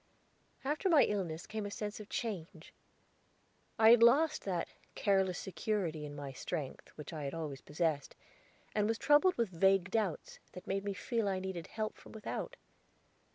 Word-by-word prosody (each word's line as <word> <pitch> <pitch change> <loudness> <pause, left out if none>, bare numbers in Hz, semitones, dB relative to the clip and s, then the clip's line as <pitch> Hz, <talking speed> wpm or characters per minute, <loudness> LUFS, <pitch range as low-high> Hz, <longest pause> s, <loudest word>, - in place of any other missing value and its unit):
After 300 +7 0
my 320 -4 +7
illness 175 -5 -2
came 215 -1 -4
a 205 - -3
sense 210 +1 -5
of 210 - -10
change. 180 -7 -5 1.0
I 220 0 +8
had 235 -1 +7
lost 280 +7 +5
that 180 -4 -1 0.3
careless 190 -3 +2
security 180 -6 -2
in 145 - -8
my 140 -2 -6
strength 140 +1 -5
which 150 +1 -8
I 155 -2 -4
had 140 - -3
always 150 -5 -5
possessed, 150 -2 -1 0.6
and 210 -1 +2
was 225 0 0
troubled 295 +8 +5
with 230 -3 +1
vague 190 +1 +3
doubts, 210 -7 -1
that 180 - -9
made 195 +1 -1
me 200 -1 -3
feel 230 0 -1
I 190 -1 +1
needed 185 -3 -4
help 215 -1 -4
from - - -14
without. 225 - -5
195 Hz, 165 wpm, -34 LUFS, 165-220 Hz, 1.0 s, I